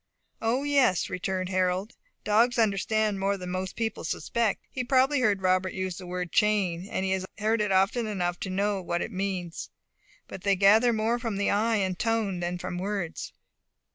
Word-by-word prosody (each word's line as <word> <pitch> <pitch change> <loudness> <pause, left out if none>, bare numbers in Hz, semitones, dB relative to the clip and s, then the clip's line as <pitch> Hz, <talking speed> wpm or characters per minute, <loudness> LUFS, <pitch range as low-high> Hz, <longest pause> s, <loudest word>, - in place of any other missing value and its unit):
"O, 235 +5 +1
yes," 275 - +2
returned 185 0 -2
Harold; 185 +3 0 0.3
"dogs 230 +4 +3
understand 215 -1 +1
more 200 +1 0
than 180 -1 -6
most 185 0 -3
people 225 -2 -3
suspect. 215 +7 -1
He 255 - -3
probably 265 +3 +3
heard 205 -6 +1
Robert 185 0 +2
use 185 -1 -3
the 180 - -9
word 180 -1 -4
'chain'; 195 -4 +1
and 190 - -2
he 190 - 0
has 190 0 -1
heard 220 +1 +1
it 210 -1 0
often 195 +5 +2
enough 180 -4 -2
to 195 - -4
know 200 +1 0
what 175 -1 -2
it - - -6
means. 185 -3 -4 0.6
But 190 - -8
they 200 0 +2
gather 210 +5 +5
more 225 +2 0
from 230 -4 -3
the 200 - +1
eye 225 +3 +2
and 190 -3 -1
tone 225 -5 0
than 175 0 -2
from 180 0 -5
words. 195 -3 -3
195 Hz, 185 wpm, -27 LUFS, 185-220 Hz, 0.6 s, gather